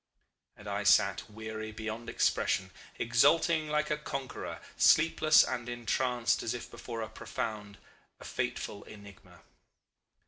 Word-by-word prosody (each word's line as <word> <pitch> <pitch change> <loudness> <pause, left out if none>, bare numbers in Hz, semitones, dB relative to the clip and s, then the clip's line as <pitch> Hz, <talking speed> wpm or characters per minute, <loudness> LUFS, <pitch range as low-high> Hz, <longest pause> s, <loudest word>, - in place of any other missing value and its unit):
"And - - -12
I - - -2
sat - - +3
weary 110 0 -6
beyond 110 +2 -6
expression, 95 -4 +1 0.3
exulting 155 +7 +3
like 150 0 0
a 150 - +1
conqueror, 140 -3 -5 0.2
sleepless 155 -1 +5
and 120 -2 -3
entranced 120 0 0
as 115 - -2
if 120 0 -8
before 115 -2 -6
a - - -5
profound, 105 -2 -5 0.4
a - - -12
fateful 100 - -4
enigma. 100 -4 -14
115 Hz, 125 wpm, -31 LUFS, 110-140 Hz, 0.4 s, sleepless